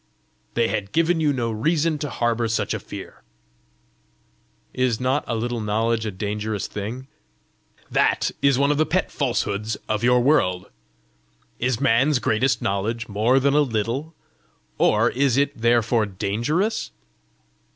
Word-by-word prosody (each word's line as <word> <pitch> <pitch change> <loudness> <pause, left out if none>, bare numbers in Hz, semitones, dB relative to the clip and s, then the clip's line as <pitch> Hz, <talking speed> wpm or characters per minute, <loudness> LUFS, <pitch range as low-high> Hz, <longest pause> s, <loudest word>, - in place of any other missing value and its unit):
"They 115 -1 +2
had 100 -1 -3
given 165 +1 +2
you 150 -2 +2
no 120 -4 -1
reason 155 +7 0
to 150 - -3
harbour 120 -1 0
such 115 - -1
a - - -3
fear!" - - -10 1.5
"Is 125 -3 0
not 130 +3 0
a 120 - -1
little 120 +1 -2
knowledge 110 +1 0
a - - -2
dangerous 105 +1 -3
thing?" 110 +6 -6 0.9
"That - - +2
is 140 -2 +4
one 140 +1 +3
of 145 - 0
the 155 - +4
pet 185 +2 0
falsehoods 110 -5 -1
of 110 0 -1
your 125 +1 +4
world! 90 -10 +1 0.9
Is 125 -1 0
man's 135 +2 +3
greatest 125 +2 +1
knowledge 110 +4 -2
more 110 +6 +2
than 140 +1 +2
a 150 - +4
little? 130 +5 -2 0.6
or 110 +3 +3
is 135 -1 +1
it 140 0 +1
therefore 115 -1 +2
dangerous? 120 - -1
120 Hz, 140 wpm, -23 LUFS, 110-140 Hz, 1.5 s, is